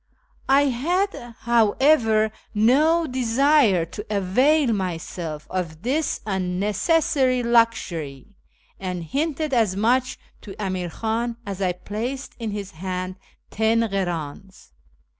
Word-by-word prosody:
I 275 +1 +6
had, 340 +10 0 0.3
however, 225 -1 +3 0.2
no 300 +10 +4
desire 255 - +3
to 205 +5 -8
avail 240 +8 +2
myself 170 -4 -4
of 170 -3 -4
this 290 +6 -1
unnecessary 245 - +1
luxury, 205 - 0 0.4
and 180 -2 -4
hinted 300 - -2
as 220 -6 +2
much 250 +5 +1 0.2
to 195 - -10
Amir 185 -3 -2
Khan 230 +5 -2
as 200 -1 -5
I 180 -2 +1
placed 230 +9 -5
in 225 -2 -3
his 205 -1 -5
hand 185 +1 -5 0.3
ten 220 +2 +2
krdns. 190 -4 -4
220 Hz, 105 wpm, -23 LUFS, 185-260 Hz, 0.4 s, I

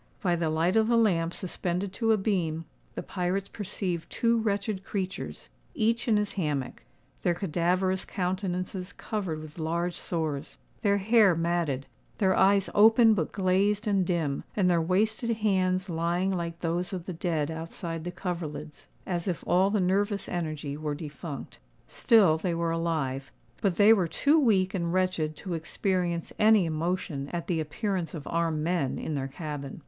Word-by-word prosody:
By 180 -4 +1
the 165 -2 0
light 165 +5 +1
of 220 0 +4
the 235 0 +3
lamp 170 -7 +2
suspended 185 +1 -3
to 225 +2 +1
a 220 - +4
beam, 175 -6 -1 0.3
the - - -4
pirates 190 +1 -2
perceived 185 -4 -4
two 230 0 +2
wretched 200 -2 -1
creatures, 195 -1 -5 0.3
each 230 -2 +1
in 220 -3 +4
his 210 -1 -1
hammock,—their 145 - -3
cadaverous 180 +2 0
countenances 185 0 -3
covered 190 -8 -3
with 155 +1 -10
large 170 +2 -1
sores, 155 -5 -3 0.2
their 200 -1 +3
hair 205 -2 +5
matted, 165 -5 0 0.3
their 190 -3 +3
eyes 195 +1 +4
open 225 +2 +7
but 170 -7 -1
glazed 200 +3 +1
and 200 -3 +2
dim, 165 -6 -1
and 195 -3 +3
their 175 -2 +3
wasted 215 +7 +1
hands 185 -3 +1
lying 175 +2 0
like 170 -2 -3
those 175 +2 -1
of 180 -3 -4
the 185 - -4
dead 160 -3 -1
outside 165 0 -5
the 175 - -3
coverlids, 160 -5 -5 0.2
as 175 -1 -2
if 175 -4 -2
all 185 +3 +3
the 210 0 +1
nervous 200 +2 +1
energy 155 -5 -3
were 150 -1 -3
defunct. 150 -1 -7 0.3
Still 195 -9 +4
they 170 +1 -1
were 165 0 0
alive; 150 -5 -2 0.3
but 195 -4 +1
they 205 +4 +7
were 190 -6 +2
too 290 - +3
weak 195 -9 +3
and 170 -3 -1
wretched 180 -4 0
to 185 +3 -6
experience 170 +1 -1
any 215 -3 +6
emotion 160 -3 -2
at 170 -1 -3
the 170 -3 0
appearance 180 +3 -2
of 150 - -7
armed 165 -2 0
men 165 -5 0
in 155 - -4
their 135 -2 -2
cabin. 140 -1 -6
180 Hz, 165 wpm, -28 LUFS, 165-195 Hz, 0.3 s, open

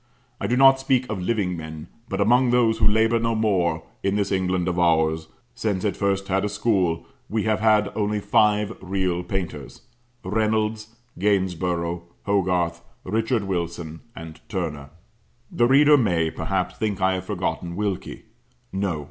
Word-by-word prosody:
I - - -2
do 125 - +1
not 135 0 +7
speak 130 -2 +1
of 100 -4 -3
living 95 -2 0
men; 80 -1 -8 0.2
but 95 - -3
among 120 +5 +4
those 115 -2 +3
who 110 - +4
labour 110 +2 +3
no 115 0 0
more, 90 -7 +1 0.2
in 100 0 0
this 100 -1 0
England 95 -2 0
of 90 0 -1
ours, 80 -2 +2 0.3
since 100 -4 -2
it 105 - 0
first 100 -1 -1
had 95 0 +1
a 105 - 0
school, 100 -5 0 0.2
we 110 0 0
have 110 -1 +1
had 105 -2 +3
only 105 0 0
five 105 -1 +2
real 95 -2 -1
painters; 85 -7 -5 0.4
Reynolds, 110 +2 0 0.3
Gainsborough, 90 -3 0 0.2
Hogarth, 90 -4 0 0.2
Richard 110 +3 0
Wilson, 85 -4 -4
and 80 -1 -9
Turner. 80 -8 -4 0.6
The 120 - +3
reader 145 +3 +6
may, 85 - +1
perhaps, 95 +1 -2
think 105 -3 -1
I 95 0 +2
have 95 0 -4
forgotten 90 -3 -3
Wilkie. 100 -1 -3 0.5
No. 95 -5 -1
100 Hz, 155 wpm, -23 LUFS, 90-110 Hz, 0.6 s, not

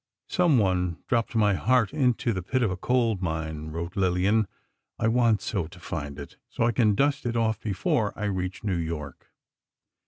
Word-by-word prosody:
"Someone 95 - +2
dropped 120 -1 0
my 105 -2 +4
heart 125 +4 +2
into 125 -5 +1
the 95 - -3
pit 125 +8 0
of 105 - +1
a - - -1
coal 115 +3 +1
mine," 80 -3 -3
wrote 85 +4 -5
Lillian. 95 +3 +2 0.5
"I 115 - +1
want 115 -2 +3
so 95 -8 -2
to 90 +2 -14
find 70 -4 -5
it, 70 -1 -9
so - - -2
I 120 - +3
can 110 -3 +3
dust 140 +4 +1
it 120 -1 -1
off 110 -1 0
before 105 +1 0
I 105 - -4
reach 95 -2 -2
New 95 -4 0
York." 80 -4 -5
105 Hz, 180 wpm, -26 LUFS, 90-115 Hz, 0.5 s, my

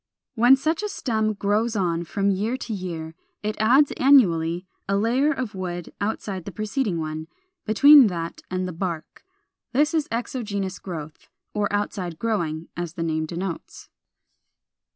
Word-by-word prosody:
] - - -66
429. 240 +1 +3
When 270 - +9
such 315 +6 0
a 420 - -1
stem 220 - 0
grows 210 +3 0
on 170 -4 0
from 200 +4 0
year 215 +6 -1
to 230 - -5
year, 170 -5 -5 0.3
it 215 0 -1
adds 260 +7 +5
annually 180 -10 +4 0.2
a 200 - +2
layer 250 +8 +2
of 260 -7 -3
wood 175 -2 -5
outside 200 -3 -3
the 200 - -6
preceding 215 -1 -1
one, 155 0 -4 0.4
between 280 +4 +8
that 170 -3 -4
and 185 0 -2
the 180 - -5
bark. 165 -2 -5 0.5
This 295 +5 +3
is 315 -3 +1
exogenous 210 -5 -3
growth, 160 -5 -8 0.2
or 205 -1 0
outside 195 -4 -2
growing, 170 -8 -2
as 175 -1 -4
the 170 - -3
name 160 -1 -1
denotes. 175 +1 -6
200 Hz, 155 wpm, -24 LUFS, 170-230 Hz, 0.5 s, When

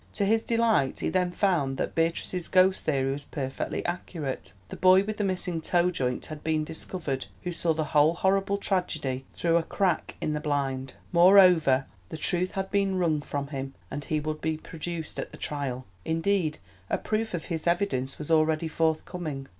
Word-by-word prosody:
To 200 - 0
his 220 +2 +3
delight 230 - +1
he - - 0
then 180 -1 +1
found 170 -8 +1
that - - -2
Beatrice's 165 +2 -1
ghost 185 0 +4
theory 135 -3 +1
was 140 +1 -4
perfectly 135 -2 -4
accurate; 165 -5 -4 0.2
the - - -6
boy 185 +1 +6
with 215 +1 -4
the 210 - 0
missing 180 -3 -1
toe 175 +2 +2
joint 125 -7 -2
had 155 -2 -8
been 155 -1 +1
discovered 155 -3 -4 0.2
who 180 - -2
saw 165 -1 0
the 155 - 0
whole 155 +2 +5
horrible 195 +2 +1
tragedy 155 -10 -2
through 170 -1 +2
a - - +3
crack 180 0 -1
in 155 - -1
the 150 - -1
blind; 135 -3 -2 0.2
moreover 175 -7 +6 0.2
the - - -6
truth 180 +4 0
had 190 0 -3
been 195 -2 +1
wrung 160 -4 +1
from 140 -1 -4
him 135 -1 -5 0.2
and 145 -1 -5
he 155 - 0
would 155 0 -4
be 160 -1 -1
produced 165 0 -6
at - - -4
the - - -11
trial—indeed 150 - -2 0.3
a - - +1
proof 220 -2 -2
of 165 - -4
his 165 -1 -3
evidence 170 -7 0
was 150 +1 -5
already 160 0 +3
forthcoming. 160 -2 -2
160 Hz, 180 wpm, -27 LUFS, 145-185 Hz, 0.3 s, boy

